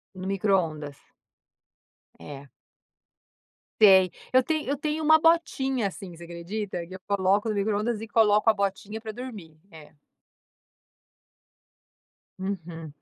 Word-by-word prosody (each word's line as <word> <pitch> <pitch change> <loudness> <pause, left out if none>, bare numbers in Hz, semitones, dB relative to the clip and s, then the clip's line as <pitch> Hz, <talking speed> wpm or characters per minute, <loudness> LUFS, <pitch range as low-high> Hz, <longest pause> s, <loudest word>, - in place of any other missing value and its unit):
No 185 0 -6
microondas? 170 -8 -1 1.2
É. 140 -1 -10 1.3
Sei. 190 -4 +7 0.2
Eu 255 - +6
tenho 310 +2 -2
eu 280 - 0
tenho 305 +2 -2
uma 315 +1 +6
botinha 270 -8 +2
assim, 185 -2 -9
você 170 - -12
acredita? 175 +2 -5
Que 185 - -9
eu - - -9
coloco 200 +1 +1
no 220 - 0
microondas 210 +2 -1
e 225 - -6
coloco 215 -1 +3
a - - +5
botinha 200 +2 -3
pra 220 -1 -7
dormir. 215 -9 -9
É. 160 -3 -14 2.5
Uhum. 165 -5 -6
200 Hz, 120 wpm, -26 LUFS, 175-225 Hz, 2.5 s, Sei